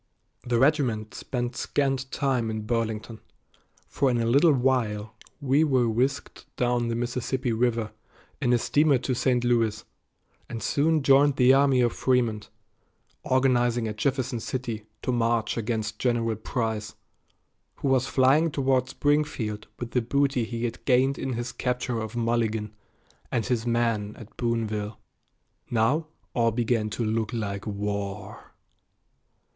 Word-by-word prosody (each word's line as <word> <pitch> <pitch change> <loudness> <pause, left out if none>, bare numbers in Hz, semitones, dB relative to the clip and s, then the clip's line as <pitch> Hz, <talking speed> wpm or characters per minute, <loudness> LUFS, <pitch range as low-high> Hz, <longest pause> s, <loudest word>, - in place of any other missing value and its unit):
The 120 -1 0
regiment 125 -6 +1
spent 120 -1 -4
scant 135 -2 -1
time 130 -5 0
in 110 0 -3
Burlington, 110 -1 -2 0.7
for 135 - +1
in 120 - +1
a 115 - 0
little 140 +8 +5
while 120 -5 0 0.3
we 140 +1 +3
were 130 -6 +2
whisked 130 +5 -2
down 120 -1 +1
the 115 - -1
Mississippi 125 +2 -2
River 115 -1 0 0.5
in 120 - +2
a 120 - +5
steamer 145 +3 +3
to 130 +1 -2
St. 125 0 +1
Louis, 115 -3 +1 0.6
and 115 -1 -5
soon 155 +1 +2
joined 140 +1 +5
the 130 -1 +5
army 135 -2 +4
of 120 -1 +2
Frémont, 120 -5 0 0.7
organizing 120 -3 +2
at 105 -1 -5
Jefferson 130 -1 -1
City 115 -3 -4 0.2
to - - 0
march 115 -2 +1
against 110 -1 -3
General 115 -3 +1
Price, 110 -1 -3 0.8
who - - -3
was 130 -1 +2
flying 140 +5 +4
toward 130 -3 +1
Springfield 140 -9 -1
with 120 -1 -6
the 125 - +1
booty 135 0 +1
he 115 0 -5
had 115 - -5
gained 130 +1 +3
in 135 -1 -2
his 120 +2 -3
capture 125 -1 -2
of 110 +1 -5
Mulligan 115 -2 0 0.6
and 115 - 0
his 120 -2 -1
men 115 -3 0
at 110 -1 -13
Boonville. 110 -3 -2 0.7
Now 130 +8 +1 0.3
all 115 -1 +3
began 115 -1 0
to 115 +2 -2
look 110 0 -1
like 100 -3 -4
war. 100 -1 -5
120 Hz, 140 wpm, -26 LUFS, 110-130 Hz, 0.8 s, little